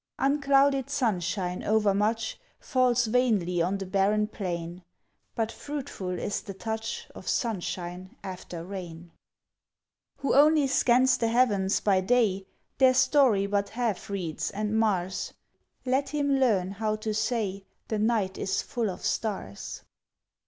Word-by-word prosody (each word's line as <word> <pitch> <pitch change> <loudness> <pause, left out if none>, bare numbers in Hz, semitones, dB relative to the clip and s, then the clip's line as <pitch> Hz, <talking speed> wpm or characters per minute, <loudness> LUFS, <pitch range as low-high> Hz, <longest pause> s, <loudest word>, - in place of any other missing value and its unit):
Unclouded 275 -1 +3
sunshine 185 - -1
overmuch 215 +1 +1 0.2
Falls 250 -3 +2
vainly 215 -7 +1
on 185 +4 0
the 195 - -5
barren 200 +3 +2
plain; 175 -4 -5 0.5
But 225 -1 -1
fruitful 265 -12 -5
is 205 - -2
the 195 - -8
touch 220 +2 -4
Of - - -11
sunshine 185 -5 -3
after 180 -3 -7
rain! 175 -3 -8 1.1
Who 275 - 0
only 300 +1 +5
scans 260 -1 +3
the 230 - +1
heavens 215 -5 +2
by 195 -2 +3
day 195 -3 +1 0.3
Their 260 -1 +6
story 255 -6 +4
but 200 0 0
half 230 -5 -2
reads, 180 -6 -3
and 210 +1 -2
mars; 190 -4 0 0.5
Let 265 +2 +1
him 285 -2 +1
learn 200 -8 +2
how 215 +2 -1
to 215 0 -3
say, 215 -3 -1 0.2
"The 215 - -1
night 210 -4 0
is 190 - -1
full 230 -4 -2
of 185 - -6
stars!" 190 - -3
215 Hz, 130 wpm, -27 LUFS, 190-250 Hz, 1.1 s, Their